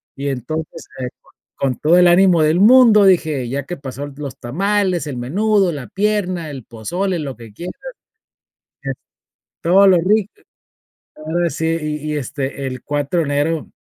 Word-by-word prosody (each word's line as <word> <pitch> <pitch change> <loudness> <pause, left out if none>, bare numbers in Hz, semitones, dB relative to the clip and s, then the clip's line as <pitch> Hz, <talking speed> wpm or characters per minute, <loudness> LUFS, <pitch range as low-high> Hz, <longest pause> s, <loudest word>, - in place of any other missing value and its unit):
y 140 +1 -4
entonces 155 +5 -5 0.7
con 130 -3 -1
todo 165 +4 +4
el 180 0 +6
ánimo 175 -1 +5
del 155 +4 +2
mundo, 220 -2 +7
dije: 155 -9 +2
"Ya 140 +2 -3
que 175 - -6
pasó 140 +1 -7
los 140 -3 -7
tamales, 185 +5 -1
el 135 -4 -5
menudo, 195 - +1
la 140 -5 -7
pierna, 190 -5 -1
el 130 -5 -9
pozole, 175 - -3
lo 135 -6 -5
que 115 -3 -13
quieras". 175 - -7 1.1
Que - - -3 0.7
todo 190 +4 +5
lo 185 -2 +6
ric 205 +4 +1 0.9
ahora 165 +3 -1
sí, 160 - -3 0.2
y 150 0 -4
y 150 - -1
este 140 0 -4
el 130 -1 -6
4 145 +3 -1
de - - -1
enero 145 +2 -1
160 Hz, 155 wpm, -18 LUFS, 140-185 Hz, 1.1 s, mundo